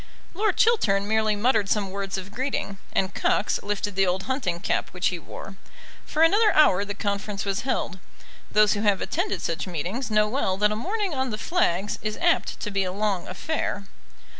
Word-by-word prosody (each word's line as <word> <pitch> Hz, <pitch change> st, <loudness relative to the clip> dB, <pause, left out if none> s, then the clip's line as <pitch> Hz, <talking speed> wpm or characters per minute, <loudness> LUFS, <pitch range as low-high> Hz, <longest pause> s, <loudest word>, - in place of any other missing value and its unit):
Lord 425 Hz, +5 st, 0 dB
Chiltern 215 Hz, -, +3 dB
merely 220 Hz, 0 st, +2 dB
muttered 215 Hz, -2 st, +2 dB
some 200 Hz, -3 st, 0 dB
words 195 Hz, 0 st, -3 dB
of 190 Hz, +1 st, -7 dB
greeting, 250 Hz, -6 st, -3 dB
and 190 Hz, 0 st, 0 dB
Cox -, -, +1 dB
lifted 205 Hz, -1 st, -2 dB
the 195 Hz, -1 st, +3 dB
old 185 Hz, +2 st, 0 dB
hunting 235 Hz, -11 st, -2 dB
cap -, -, -1 dB
which 180 Hz, +2 st, +2 dB
he 180 Hz, -, -4 dB
wore. 195 Hz, +4 st, -10 dB, 0.5 s
For 315 Hz, -, +2 dB
another 415 Hz, +6 st, +5 dB
hour 200 Hz, -11 st, +5 dB
the 205 Hz, 0 st, -5 dB
conference 200 Hz, -1 st, -3 dB
was 195 Hz, -1 st, -1 dB
held. 195 Hz, -8 st, -2 dB, 0.5 s
Those 210 Hz, -1 st, +4 dB
who 205 Hz, -, -2 dB
have 205 Hz, -3 st, +3 dB
attended 380 Hz, +5 st, -2 dB
such 165 Hz, +3 st, -2 dB
meetings 185 Hz, -, -3 dB
know 215 Hz, 0 st, +3 dB
well 210 Hz, -5 st, 0 dB
that 210 Hz, +1 st, +3 dB
a -, -, -1 dB
morning 390 Hz, -, -2 dB
on 265 Hz, -2 st, -1 dB
the 215 Hz, -, -3 dB
flags 210 Hz, -, 0 dB
is 215 Hz, 0 st, -3 dB
apt -, -, +1 dB
to 210 Hz, -, -3 dB
be 195 Hz, -1 st, +1 dB
a 185 Hz, -, -2 dB
long 200 Hz, -2 st, -1 dB
affair. 205 Hz, 0 st, -3 dB
205 Hz, 190 wpm, -25 LUFS, 195-260 Hz, 0.5 s, another